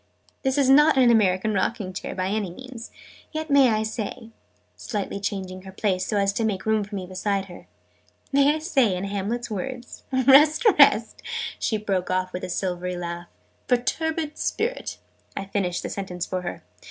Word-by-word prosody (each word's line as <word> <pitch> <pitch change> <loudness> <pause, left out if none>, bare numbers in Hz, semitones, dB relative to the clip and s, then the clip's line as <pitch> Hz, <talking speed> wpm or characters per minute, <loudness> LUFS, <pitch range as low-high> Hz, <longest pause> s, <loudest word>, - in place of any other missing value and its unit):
"This 265 0 0
is 280 -2 +3
not 295 +2 +6
an 250 -2 +6
American 210 -1 +2
rocking 200 -1 -1
chair, - - -5
by 185 - -1
any 205 -2 -1
means! 245 +5 -9 0.4
Yet 315 -1 -4
may 275 -2 +6
I 215 -1 +1
say," 220 +1 -5 0.4
slightly 200 -2 -4
changing 190 -2 -4
her 190 0 -10
place, 185 -2 -1
so 210 - 0
as 200 0 +2
to 225 - -1
make 205 -4 -1
room 220 -1 +2
for 205 +1 -8
me 190 -2 -4
beside 195 +2 -2
her, 180 -2 -13 0.6
"may 280 +2 +4
I - - -1
say, 270 - +2
in 180 - -4
Hamlet's 205 +4 -3
words, 245 +4 -6
'Rest, 275 - +5
rest - - +5 0.2
'" - - -6
she 220 - 0
broke 195 -4 -2
off 185 0 -1
with 180 - -5
a - - -4
silvery 180 0 -2
laugh. 175 0 -5 0.2
" - - -40
perturbed 305 +5 -1
Spirit!"' 480 +3 -2 0.4
I 195 - -3
finished 190 -3 -2
the - - -4
sentence 180 -3 -4
for 185 -1 -3
her. 175 - -6
210 Hz, 185 wpm, -24 LUFS, 185-260 Hz, 0.6 s, not